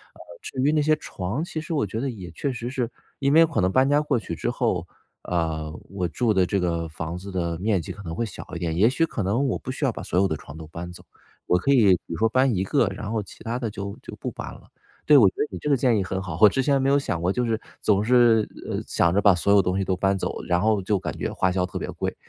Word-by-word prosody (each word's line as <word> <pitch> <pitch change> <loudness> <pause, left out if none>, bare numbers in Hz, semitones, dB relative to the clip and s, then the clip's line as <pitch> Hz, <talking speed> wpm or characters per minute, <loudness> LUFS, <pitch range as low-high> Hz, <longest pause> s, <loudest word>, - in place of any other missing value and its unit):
呃， - - -18 0.2
至 130 - -4
于 145 +3 +3
那 155 - +2
些 155 +1 +3
床 105 - -4
其 160 -2 -5
实 160 +1 -5
我 140 -8 +1
觉 110 +4 -4
得 135 +1 -1
也 95 -7 -7
确 135 - -3
实 120 0 -5
是 125 -3 -2 0.3
因 140 +1 +2
为 165 +1 +7
可 115 - -2
能 95 +1 +2
搬 130 +4 +3
家 145 +1 +4
过 150 -5 0
去 85 -5 -6
之 120 - -2
后， 95 -9 -1 0.4
呃， 80 -3 -2 0.2
我 95 -3 -2
住 115 +6 0
的 95 -2 +3
这 100 +2 0
个 85 -2 -1
房 80 +2 -5
子 100 +2 -8
的 85 -3 -2
面 100 -3 +1
积 - - -7
可 105 - -9
能 80 -3 -5
会 115 - -1
小 110 - -9
一 85 - -4
点。 80 -2 -2
也 105 +5 +5
许 165 +6 +1
可 110 - -3
能 120 +9 +1
我 - - 0
不 130 - -6
需 140 +2 -2
要 130 - +2
把 - - -7
所 90 - 0
有 95 - +4
的 80 -5 -2
床 70 - -12
都 80 - -9
搬 85 +2 -7
走， - - -13 0.4
我 90 - +4
可 140 +10 +1
以 105 -8 +6
比 - - -3 0.2
如 - - -4
说 110 +6 +2
搬 130 0 +2
1 95 - 0
个， 115 +2 +2
然 100 +2 -6
后 110 -2 -1
其 - - -14
它 115 +2 -2
的 115 -3 -2
就 100 0 -6
就 - - -8
不 - - -4
搬 - - -7
了。 - - -16 0.4
对， 150 - +8
我 110 -7 +7
觉 - - -20
得 150 - 0
你 - - -5
这 - - -5
个 140 - +5
建 120 -3 +3
议 100 - +1
很 95 +1 -3
好， 85 -4 -5
我 105 - +10
之 135 - 0
前 140 0 +2
没 135 - +2
有 140 - +4
想 90 -11 -2
过 90 +2 +1
就 125 - 0
是 115 -1 0 0.2
总 100 -1 +2
是， 120 -2 +4 0.2
呃， - - -1
想 85 0 +2
着 100 - +3
把 100 -2 +6
所 95 +3 +1
有 100 - +7
东 90 +1 0
西 95 - +1
都 95 -1 0
搬 95 0 +2
走， - - -4
然 90 +1 +1
后 110 -1 +2
就 100 -1 +1
感 - - -5
觉 - - -3
花 95 - +1
销 90 0 0
特 90 - -6
别 - - -5
贵， - - -3
100 Hz, 320 characters per minute, -24 LUFS, 90-125 Hz, 0.4 s, 我